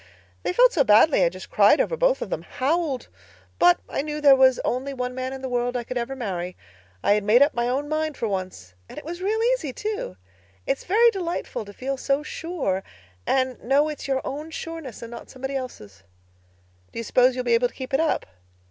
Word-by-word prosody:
They -, -, -1 dB
felt -, -, +5 dB
so 295 Hz, -, +4 dB
badly 220 Hz, -, +5 dB
I -, -, +4 dB
just -, -, -11 dB
cried -, -, +5 dB
over -, -, +1 dB
both -, -, +2 dB
of -, -, -9 dB
them—howled. 285 Hz, -1 st, -1 dB, 0.5 s
But 175 Hz, 0 st, +5 dB
I -, -, -2 dB
knew 300 Hz, +1 st, -4 dB
there 285 Hz, -2 st, +7 dB
was 260 Hz, -1 st, +5 dB
only 270 Hz, +3 st, -2 dB
one 250 Hz, 0 st, -3 dB
man 255 Hz, 0 st, -4 dB
in 265 Hz, 0 st, -7 dB
the -, -, -2 dB
world 245 Hz, 0 st, -1 dB
I 240 Hz, -, -3 dB
could 255 Hz, -, -6 dB
ever 245 Hz, +2 st, -2 dB
marry. 185 Hz, -7 st, -4 dB, 0.5 s
I -, -, +4 dB
had 210 Hz, 0 st, +1 dB
made 225 Hz, +6 st, +6 dB
up 290 Hz, -, +1 dB
my 240 Hz, 0 st, 0 dB
own 275 Hz, +3 st, -1 dB
mind 310 Hz, -1 st, -2 dB
for 230 Hz, -, -1 dB
once 185 Hz, -, -5 dB, 0.2 s
and -, -, -11 dB
it -, -, -8 dB
was 345 Hz, +3 st, -6 dB
real 420 Hz, +4 st, 0 dB
easy, 315 Hz, -, -3 dB
too. 420 Hz, -, -4 dB, 0.5 s
It's 270 Hz, -, -2 dB
very 460 Hz, +5 st, +5 dB
delightful 350 Hz, -, -4 dB
to 205 Hz, -, -10 dB
feel 270 Hz, +5 st, -3 dB
so 275 Hz, +2 st, 0 dB
sure, 300 Hz, -, -3 dB, 0.5 s
and 260 Hz, -1 st, 0 dB
know 280 Hz, +5 st, +3 dB
it's 300 Hz, -, -6 dB
your 265 Hz, -1 st, 0 dB
own 300 Hz, +3 st, -5 dB
sureness 325 Hz, -7 st, -7 dB
and 230 Hz, -, -8 dB
not 235 Hz, -, -9 dB
somebody 265 Hz, +1 st, -5 dB
else's." 105 Hz, -, -7 dB, 0.9 s
"Do -, -, -11 dB
you 230 Hz, -, -2 dB
suppose 250 Hz, +3 st, +3 dB
you'll 250 Hz, -, -2 dB
be 240 Hz, -, +2 dB
able 240 Hz, +1 st, +4 dB
to -, -, -19 dB
keep 260 Hz, +1 st, -7 dB
it 270 Hz, -, +3 dB
up?" 325 Hz, -1 st, +1 dB
265 Hz, 220 wpm, -24 LUFS, 240-310 Hz, 0.9 s, there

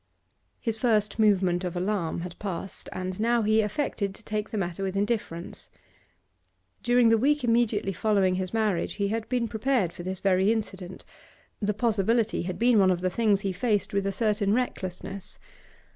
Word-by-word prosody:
His 225 Hz, -2 st, -2 dB
first 215 Hz, -3 st, +1 dB
movement 190 Hz, -4 st, +3 dB
of 180 Hz, -1 st, -3 dB
alarm 180 Hz, -3 st, -1 dB
had 175 Hz, 0 st, -8 dB
passed, 195 Hz, -1 st, -6 dB
and 185 Hz, +1 st, -5 dB
now 235 Hz, +1 st, +2 dB
he 215 Hz, +1 st, +3 dB
affected 210 Hz, -3 st, -2 dB
to 225 Hz, -, -16 dB
take 210 Hz, 0 st, -3 dB
the 220 Hz, -, -4 dB
matter 175 Hz, -2 st, -3 dB
with 195 Hz, 0 st, -2 dB
indifference. 200 Hz, -5 st, -3 dB, 1.1 s
During 240 Hz, -1 st, +4 dB
the 225 Hz, -1 st, +4 dB
week 290 Hz, +3 st, +2 dB
immediately 230 Hz, -4 st, +1 dB
following 195 Hz, -1 st, +2 dB
his 185 Hz, 0 st, -2 dB
marriage 215 Hz, -6 st, 0 dB
he 200 Hz, -1 st, -1 dB
had 225 Hz, +1 st, -3 dB
been 245 Hz, -2 st, 0 dB
prepared 220 Hz, -5 st, 0 dB
for -, -, -8 dB
this 185 Hz, +1 st, -4 dB
very 190 Hz, +1 st, +3 dB
incident; 190 Hz, -5 st, -4 dB, 0.6 s
the 210 Hz, 0 st, 0 dB
possibility 225 Hz, 0 st, +1 dB
had 175 Hz, 0 st, -4 dB
been 235 Hz, +1 st, +4 dB
one 190 Hz, -1 st, +5 dB
of 180 Hz, -1 st, +1 dB
the 185 Hz, 0 st, 0 dB
things 210 Hz, -2 st, +2 dB
he 195 Hz, -2 st, -2 dB
faced 205 Hz, +1 st, 0 dB
with 200 Hz, 0 st, 0 dB
a -, -, 0 dB
certain 210 Hz, 0 st, +1 dB
recklessness. 195 Hz, -5 st, -4 dB
205 Hz, 175 wpm, -27 LUFS, 185-225 Hz, 1.1 s, one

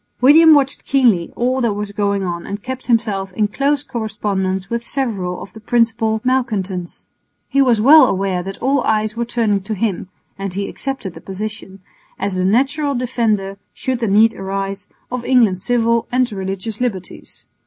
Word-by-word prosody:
William 310 Hz, +5 st, +7 dB
watched 275 Hz, -2 st, +1 dB
keenly 235 Hz, -11 st, +2 dB
all 255 Hz, +2 st, 0 dB
that 230 Hz, -4 st, +1 dB
was 205 Hz, 0 st, -4 dB
going 200 Hz, -1 st, 0 dB
on 170 Hz, -2 st, -4 dB
and 200 Hz, +1 st, -6 dB
kept 260 Hz, 0 st, -6 dB
himself 210 Hz, -5 st, 0 dB
in 210 Hz, +1 st, +1 dB
close 280 Hz, +6 st, 0 dB
correspondence 195 Hz, -5 st, -2 dB
with 235 Hz, +2 st, -3 dB
several 205 Hz, -10 st, -2 dB
of 180 Hz, -, -13 dB
the -, -, -11 dB
principal 225 Hz, -1 st, +1 dB
malcontents. 210 Hz, -9 st, -2 dB, 0.4 s
He 275 Hz, -, +2 dB
was 245 Hz, -5 st, +3 dB
well 295 Hz, +8 st, +8 dB
aware 190 Hz, -1 st, -1 dB
that 195 Hz, +2 st, -7 dB
all 275 Hz, +1 st, +2 dB
eyes 215 Hz, -1 st, 0 dB
were 235 Hz, +1 st, -2 dB
turning 225 Hz, -4 st, 0 dB
to 215 Hz, +3 st, -4 dB
him 195 Hz, -3 st, -2 dB, 0.3 s
(and 195 Hz, -2 st, -4 dB
he 200 Hz, 0 st, -2 dB
accepted 270 Hz, -10 st, -5 dB
the -, -, -12 dB
position) 195 Hz, -1 st, -7 dB, 0.4 s
as 200 Hz, -, -2 dB
the 185 Hz, 0 st, -1 dB
natural 275 Hz, +8 st, +1 dB
defender, 220 Hz, -6 st, -1 dB, 0.2 s
should 260 Hz, -2 st, -2 dB
the 230 Hz, -, -1 dB
need 220 Hz, +3 st, +4 dB
arise, 195 Hz, +1 st, -4 dB, 0.2 s
of 250 Hz, -1 st, -3 dB
England's 225 Hz, -9 st, +2 dB
civil 230 Hz, -1 st, +1 dB
and 250 Hz, -1 st, +1 dB
religious 195 Hz, +3 st, -5 dB
liberties. 200 Hz, -7 st, -5 dB
220 Hz, 170 wpm, -18 LUFS, 195-250 Hz, 0.4 s, well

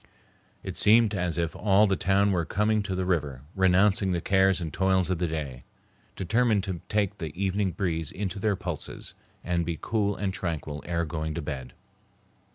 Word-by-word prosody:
It -, -, -5 dB
seemed 110 Hz, 0 st, +5 dB
as 90 Hz, -4 st, -1 dB
if 85 Hz, -1 st, -1 dB
all 105 Hz, 0 st, +4 dB
the 100 Hz, -2 st, +2 dB
town 100 Hz, +2 st, +2 dB
were 90 Hz, -3 st, +1 dB
coming 105 Hz, +5 st, +1 dB
to 100 Hz, -2 st, -3 dB
the 95 Hz, 0 st, -1 dB
river, 75 Hz, -8 st, -1 dB
renouncing 95 Hz, +1 st, +3 dB
the 85 Hz, -, 0 dB
cares 95 Hz, +1 st, +3 dB
and 80 Hz, -4 st, -5 dB
toils 95 Hz, -1 st, +2 dB
of 90 Hz, -, -1 dB
the 90 Hz, -, +1 dB
day, 70 Hz, -6 st, -5 dB, 0.5 s
determined 110 Hz, +2 st, +2 dB
to 95 Hz, -4 st, -4 dB
take 105 Hz, -1 st, 0 dB
the 80 Hz, -4 st, -4 dB
evening 100 Hz, 0 st, +1 dB
breeze 80 Hz, -3 st, -2 dB
into 100 Hz, 0 st, -4 dB
their 105 Hz, 0 st, +1 dB
pulses, 90 Hz, -6 st, -6 dB, 0.3 s
and 85 Hz, -1 st, 0 dB
be 85 Hz, -1 st, -3 dB
cool 105 Hz, 0 st, 0 dB
and 95 Hz, -2 st, -2 dB
tranquil 80 Hz, -5 st, -4 dB
ere 85 Hz, -1 st, 0 dB
going 80 Hz, 0 st, -4 dB
to 85 Hz, -, -2 dB
bed. 65 Hz, -4 st, -6 dB
95 Hz, 180 wpm, -27 LUFS, 85-100 Hz, 0.5 s, seemed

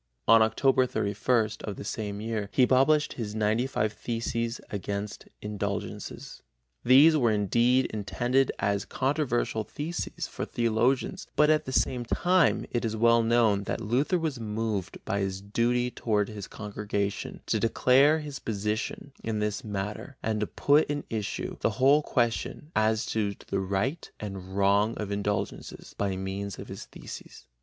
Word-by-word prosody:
On 115 Hz, 0 st, +7 dB
Oct 130 Hz, +3 st, +3 dB
31 110 Hz, +2 st, 0 dB
of 100 Hz, -, -4 dB
the -, -, -7 dB
same 105 Hz, -1 st, -4 dB
year 110 Hz, -2 st, -3 dB
he 130 Hz, -, +4 dB
published 135 Hz, +4 st, +3 dB
his 110 Hz, -3 st, -5 dB
95 110 Hz, +1 st, 0 dB
Theses 115 Hz, +1 st, -3 dB
against 100 Hz, 0 st, -4 dB, 0.2 s
Indulgences. 100 Hz, -1 st, -5 dB, 0.4 s
These 140 Hz, +6 st, +7 dB
were 125 Hz, -6 st, +3 dB
indeed 120 Hz, +5 st, +3 dB
intended 120 Hz, +6 st, +1 dB
as 100 Hz, 0 st, 0 dB
controversial 130 Hz, -5 st, 0 dB
theses 160 Hz, +9 st, -4 dB
for -, -, -5 dB
theologians, 120 Hz, +3 st, 0 dB
but 150 Hz, +1 st, +5 dB
at 155 Hz, -, +2 dB
the 130 Hz, -, -4 dB
same 125 Hz, -1 st, +1 dB
time 180 Hz, +7 st, +2 dB
it 120 Hz, -, -1 dB
is 110 Hz, -1 st, -1 dB
well 115 Hz, +1 st, +4 dB
known 115 Hz, -3 st, +3 dB
that -, -, -2 dB
Luther 125 Hz, -, +1 dB
was 155 Hz, -6 st, -2 dB
moved 105 Hz, -3 st, -3 dB
by 100 Hz, -, -1 dB
his 95 Hz, -1 st, -2 dB
duty 120 Hz, +5 st, 0 dB
toward 105 Hz, -4 st, 0 dB
his 105 Hz, -3 st, -7 dB
congregation 105 Hz, -1 st, -4 dB
to -, -, 0 dB
declare 135 Hz, +6 st, +4 dB
his 145 Hz, -3 st, -6 dB
position 105 Hz, +5 st, -3 dB
in 110 Hz, -1 st, -2 dB
this 105 Hz, -1 st, -2 dB
matter 105 Hz, +5 st, -5 dB
and 110 Hz, -1 st, 0 dB
to 105 Hz, -, -1 dB
put 145 Hz, +2 st, +3 dB
in 145 Hz, -1 st, -2 dB
issue 110 Hz, -3 st, -3 dB
the -, -, +2 dB
whole 140 Hz, +3 st, +5 dB
question 125 Hz, +4 st, -1 dB
as 110 Hz, 0 st, +2 dB
to 105 Hz, -2 st, -1 dB
the 100 Hz, -, 0 dB
right 100 Hz, -, -2 dB
and 95 Hz, -2 st, -6 dB
wrong 100 Hz, +3 st, +3 dB
of 105 Hz, -2 st, -4 dB
indulgences 100 Hz, 0 st, -3 dB
by 100 Hz, -2 st, -1 dB
means 95 Hz, +1 st, -4 dB
of -, -, -9 dB
his -, -, -7 dB
theses. -, -, -10 dB
110 Hz, 150 wpm, -28 LUFS, 105-130 Hz, 0.4 s, On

